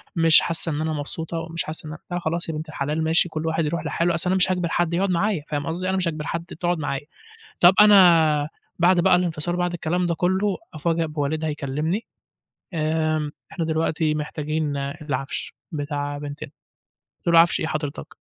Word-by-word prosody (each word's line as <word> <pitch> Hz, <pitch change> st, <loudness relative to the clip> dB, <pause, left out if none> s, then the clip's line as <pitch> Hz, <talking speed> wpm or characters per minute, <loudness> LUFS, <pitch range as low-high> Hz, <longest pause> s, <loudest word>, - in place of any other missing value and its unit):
مش 165 Hz, -1 st, +7 dB
حاسة 165 Hz, 0 st, -2 dB
إن 150 Hz, +1 st, -2 dB
أنا 160 Hz, 0 st, -1 dB
مبسوطة 160 Hz, +3 st, -5 dB
ومش 165 Hz, 0 st, -4 dB
حاسة 155 Hz, 0 st, -7 dB
إن -, -, -6 dB
أن -, -, -8 dB
قُلت -, -, -31 dB
لها 175 Hz, -, -1 dB
خلاص 170 Hz, 0 st, -2 dB
يا -, -, -2 dB
بنت 155 Hz, +1 st, -6 dB
الحلال 150 Hz, +2 st, -2 dB
ماشي 165 Hz, +2 st, +3 dB
كل 155 Hz, 0 st, -4 dB
واحد 160 Hz, 0 st, 0 dB
يرُوح 170 Hz, +3 st, -2 dB
لحالُه، 170 Hz, 0 st, +1 dB
أصل 170 Hz, +2 st, 0 dB
أنا 190 Hz, -, +2 dB
مش 185 Hz, 0 st, +3 dB
هاجبر 180 Hz, -2 st, 0 dB
حد 170 Hz, -1 st, 0 dB
يقعد 190 Hz, +2 st, +1 dB
معايا 180 Hz, -2 st, 0 dB
فاهم 145 Hz, 0 st, -2 dB
قصدي، 180 Hz, +3 st, -2 dB
أنا 190 Hz, -, +1 dB
مش 180 Hz, -2 st, 0 dB
هاجبر 155 Hz, -2 st, -3 dB
حد 170 Hz, +1 st, -3 dB
تقعد 175 Hz, -1 st, 0 dB
معايا، 145 Hz, 0 st, -3 dB, 0.6 s
طَب 175 Hz, +2 st, +8 dB
أنا 165 Hz, -7 st, +6 dB, 0.3 s
بعد 175 Hz, +1 st, +5 dB
بقى 180 Hz, +1 st, +5 dB
الانفصال 175 Hz, -1 st, -1 dB
بعد 175 Hz, 0 st, 0 dB
الكلام 175 Hz, +2 st, -1 dB
ده 170 Hz, -1 st, 0 dB
كُلُّه، 190 Hz, +4 st, +1 dB, 0.2 s
أُفاجأ 165 Hz, +2 st, 0 dB
بوالدها 155 Hz, +1 st, -2 dB
يكلمني، 150 Hz, +8 st, -2 dB, 0.7 s
آآ، 155 Hz, -1 st, 0 dB, 0.2 s
إحنا 165 Hz, -, -2 dB
دلوقتي 160 Hz, -1 st, 0 dB
محتاجين 150 Hz, 0 st, -2 dB
العفش 140 Hz, -1 st, -4 dB, 0.2 s
بتاع 145 Hz, -1 st, -3 dB
بنتنا، 145 Hz, 0 st, -7 dB, 0.7 s
قُلت -, -, -17 dB
لُه: -, -, +9 dB
"عفش 170 Hz, 0 st, +4 dB
إيه 160 Hz, -, -1 dB
حضرتك؟" 150 Hz, -2 st, -4 dB
160 Hz, 195 wpm, -23 LUFS, 150-175 Hz, 0.7 s, لُه